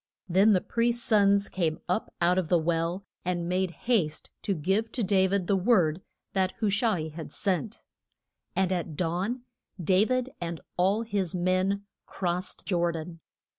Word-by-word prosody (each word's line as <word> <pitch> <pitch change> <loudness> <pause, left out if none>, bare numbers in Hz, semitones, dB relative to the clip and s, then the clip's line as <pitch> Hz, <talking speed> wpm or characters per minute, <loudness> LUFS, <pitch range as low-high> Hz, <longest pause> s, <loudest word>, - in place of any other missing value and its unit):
Then 195 +4 +5
the 185 - +3
priest's 235 0 0
sons 200 -2 +4
came 165 -4 -1
up 180 +5 -1
out 180 +2 +4
of 170 -4 -3
the 175 - +5
well, 170 +3 -1 0.2
and 175 -1 -1
made 185 +1 +1 0.2
haste 190 -11 0
to 200 - -1
give 190 +8 0
to 245 - -1
Da 190 -1 +3
vid 195 -1 0
the 200 - +2
word 185 -5 +3 0.3
that 190 -1 +1
Hu 215 -3 0
sha 220 +3 +2
i 160 -4 -2
had 160 +1 -8
sent. 200 +3 -2 0.7
And 190 -1 +2
at 170 -4 -2
dawn 185 +9 -1 0.4
Da 185 +3 +4
vid 255 +1 0
and 170 -2 -3 0.2
all 195 +5 +2
his 200 -6 -2
men 185 +3 +1 0.2
crossed 180 0 -3
Jor 175 -3 +1
dan. 165 +1 -7
185 Hz, 170 wpm, -28 LUFS, 175-200 Hz, 0.7 s, Then